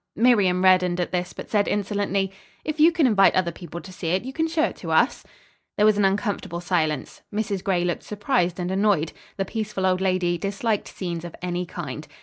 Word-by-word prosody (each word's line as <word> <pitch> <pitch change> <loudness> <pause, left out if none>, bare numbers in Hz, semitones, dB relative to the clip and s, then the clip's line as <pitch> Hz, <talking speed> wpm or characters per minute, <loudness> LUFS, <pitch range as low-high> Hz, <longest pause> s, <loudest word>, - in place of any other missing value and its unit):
Miriam 200 -6 +3
reddened 180 -1 +4
at 175 - -1
this, 180 0 -2
but - - -9
said 205 -2 +2
insolently, 200 -1 0 0.3
"If 310 0 -3
you 320 +3 +7
can 330 -3 +2
invite 205 -6 +5
other 185 -2 +2
people 170 0 -8
to 185 - -11
see 180 - -5
it, 185 +5 +1
you 265 - -6
can 320 +3 0
show 320 -1 +1
it - - 0
to - - -7
us." - - +2 0.5
There 210 - +4
was 215 -1 +5
an 205 -1 +3
uncomfortable 195 -3 -1
silence. 160 -5 -1
Mrs. 205 -3 -2
Gray 180 -3 +1
looked 175 - -1
surprised 205 -4 -1
and 180 +1 -2
annoyed. 190 -5 +2 0.3
The 195 - 0
peaceful 210 -2 -3
old 185 0 +2
lady, 185 -2 +1
disliked 205 +3 -1
scenes 170 -3 -5
of 175 - -8
any 180 0 -2
kind. 155 -4 -6
190 Hz, 205 wpm, -24 LUFS, 175-210 Hz, 0.5 s, you